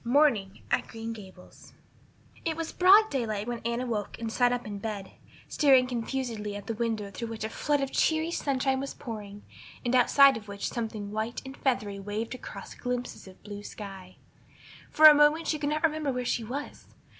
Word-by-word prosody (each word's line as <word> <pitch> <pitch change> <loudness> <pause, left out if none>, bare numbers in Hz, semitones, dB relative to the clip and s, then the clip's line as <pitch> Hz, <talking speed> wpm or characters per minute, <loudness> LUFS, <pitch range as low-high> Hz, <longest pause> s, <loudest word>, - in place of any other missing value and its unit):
Morning 235 -7 +2
at - - +1
Green 225 0 -6
Gables 190 -4 -14 0.7
IT 325 -1 -2
was 330 -1 -3
broad 400 +4 +6
daylight 220 -5 -2
when 240 -1 -3
Anne 235 +1 -2
awoke 225 -5 -3
and 225 -1 -4
sat 245 +1 +3
up 245 0 -2
in 205 -1 -6
bed, 205 -2 -5 0.4
staring 265 -4 +5
confusedly 235 -4 -3
at 205 -1 -7
the 230 - -3
window 220 -3 -2
through 230 +4 -5
which 225 -1 -6
a 220 - -2
flood 290 +4 0
of 275 - -2
cheery 320 +1 +1
sunshine 270 -4 0
was 275 +1 -5
pouring 210 -3 -8 0.4
and 240 - 0
outside 270 +2 +6
of 210 -1 -11
which 200 0 -4
something 215 -3 -4
white 220 +2 -3
and 265 0 -8
feathery 210 -8 -1
waved 210 +4 -4
across 255 - -9
glimpses 250 -4 -4
of 185 - -15
blue 205 -1 -7
sky. 195 -3 -9 0.7
For 310 - +5
a 305 - +12
moment 295 +2 +4
she 305 - 0
could 290 0 -1
not 305 +1 -1
remember 310 -3 +1
where 250 -1 -3
she 235 - 0
was. 270 +6 -6
235 Hz, 190 wpm, -28 LUFS, 210-275 Hz, 0.7 s, a